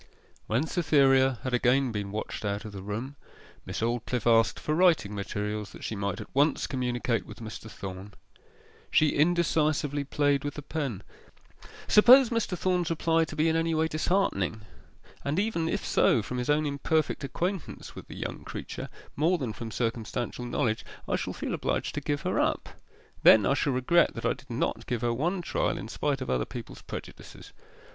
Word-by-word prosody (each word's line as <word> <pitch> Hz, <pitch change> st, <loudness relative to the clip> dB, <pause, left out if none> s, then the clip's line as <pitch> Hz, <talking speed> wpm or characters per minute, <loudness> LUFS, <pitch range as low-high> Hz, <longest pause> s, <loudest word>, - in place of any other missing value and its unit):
When 120 Hz, +8 st, +1 dB
Cytherea 135 Hz, -6 st, +3 dB
had 130 Hz, -, -3 dB
again 125 Hz, +1 st, +3 dB
been 100 Hz, -2 st, -4 dB
watched 110 Hz, +1 st, -4 dB
out 100 Hz, +1 st, -2 dB
of 110 Hz, -, -6 dB
the 100 Hz, -1 st, -7 dB
room, 115 Hz, +8 st, -5 dB, 0.5 s
Miss -, -, -4 dB
Aldclyffe 120 Hz, 0 st, -1 dB
asked 115 Hz, -1 st, +4 dB
for 150 Hz, -, -2 dB
writing 160 Hz, -, +3 dB
materials, 105 Hz, +1 st, -4 dB
that -, -, -11 dB
she 110 Hz, -, -3 dB
might 100 Hz, 0 st, -2 dB
at 105 Hz, -, -9 dB
once 145 Hz, +2 st, +2 dB
communicate 125 Hz, -2 st, -1 dB
with -, -, -10 dB
Mr. 110 Hz, 0 st, -8 dB
Thorn. 95 Hz, 0 st, -8 dB, 0.7 s
She 155 Hz, -, +4 dB
indecisively 155 Hz, -3 st, +2 dB
played 145 Hz, 0 st, +1 dB
with 145 Hz, -1 st, -4 dB
the 150 Hz, -, -7 dB
pen. 135 Hz, -, -3 dB, 0.8 s
'Suppose 245 Hz, +3 st, +7 dB
Mr. 225 Hz, -6 st, -1 dB
Thorn's 180 Hz, -1 st, +1 dB
reply 165 Hz, 0 st, +2 dB
to 155 Hz, -, -8 dB
be 155 Hz, +2 st, +2 dB
in 160 Hz, -, +2 dB
any 165 Hz, 0 st, +1 dB
way 160 Hz, +1 st, +2 dB
disheartening 155 Hz, -, 0 dB, 0.6 s
and 140 Hz, +3 st, -1 dB
even 190 Hz, -6 st, 0 dB
if 205 Hz, -, -2 dB
so 115 Hz, -, +3 dB
from 125 Hz, +5 st, -4 dB
his 125 Hz, -, -3 dB
own 150 Hz, +1 st, +3 dB
imperfect 145 Hz, +2 st, 0 dB
acquaintance 175 Hz, +6 st, -4 dB
with -, -, -10 dB
the -, -, -9 dB
young -, -, -5 dB
creature -, -, -6 dB, 0.3 s
more 165 Hz, +5 st, +2 dB
than 125 Hz, -8 st, -3 dB
from 115 Hz, +3 st, -6 dB
circumstantial 120 Hz, +2 st, -3 dB
knowledge 115 Hz, -2 st, 0 dB, 0.2 s
I -, -, +1 dB
shall -, -, -3 dB
feel -, -, -4 dB
obliged -, -, -1 dB
to 145 Hz, -, -3 dB
give 145 Hz, 0 st, -1 dB
her -, -, 0 dB
up. -, -, 0 dB, 0.5 s
Then 105 Hz, -3 st, +7 dB
I 135 Hz, -, +3 dB
shall 140 Hz, -1 st, +1 dB
regret 150 Hz, +7 st, +3 dB
that -, -, -5 dB
I -, -, +3 dB
did -, -, -17 dB
not -, -, -2 dB
give 120 Hz, -2 st, -2 dB
her 120 Hz, -1 st, +1 dB
one 175 Hz, +9 st, -1 dB
trial -, -, 0 dB
in 105 Hz, -, -6 dB
spite 140 Hz, +2 st, -1 dB
of 130 Hz, -, -4 dB
other 60 Hz, -1 st, +1 dB
people's -, -, -8 dB
prejudices. -, -, -9 dB
135 Hz, 185 wpm, -28 LUFS, 115-160 Hz, 0.8 s, Suppose